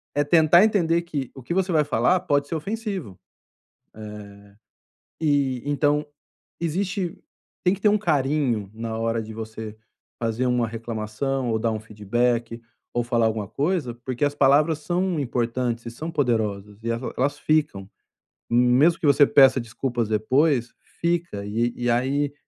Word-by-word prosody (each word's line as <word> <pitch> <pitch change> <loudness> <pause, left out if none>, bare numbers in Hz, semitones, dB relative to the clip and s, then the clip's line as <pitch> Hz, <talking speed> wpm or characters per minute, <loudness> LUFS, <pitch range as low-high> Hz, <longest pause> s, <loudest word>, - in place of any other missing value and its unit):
É 145 - +3
tentar 160 +3 +5
entender 170 -6 +2
que 145 -6 -4
o 135 - -10
que 150 - -3
você 190 0 0
vai 155 -3 +3
falar 140 +7 +2
pode 145 -5 +1
ser 165 - -3
ofensivo. 195 - -4 0.8
Eh, 105 -2 -9 0.8
e 140 -5 +1
então, 145 +1 +1 0.6
existe 180 +2 -2 0.5
tem 180 - +4
que 200 - -11
ter 210 - +4
um 210 - +3
carinho 140 - 0
na 115 0 -4
hora 115 0 -1
de 110 0 -9
você 110 -1 -7 0.4
fazer 115 +2 -1
uma 125 -1 +1
reclamação 115 +3 -3
ou 110 - +1
dar 115 - +1
um 110 - -2
feedback 115 +3 -1 0.3
ou 120 - 0
falar 120 -1 +2
alguma 110 -2 -1
coisa, 145 - -1
porque 130 +2 -1
as 145 - 0
palavras 145 +3 +4
são 175 0 -1
importantes 120 -2 -2
e - - -4
são 155 +8 -6
poderosas. 110 -8 -1
E 115 - -4
el 115 +2 -3
elas 145 +3 0
ficam, 150 -13 0 0.6
mesmo 125 +8 +4
que 155 - 0
você 145 0 +6
peça 135 -2 +6
desculpas 120 0 -3
depois, 125 +4 +1 0.3
fica 170 - -1
e 115 +3 0
e 120 0 -1
aí, 135 +4 +1
130 Hz, 155 wpm, -24 LUFS, 115-155 Hz, 0.8 s, você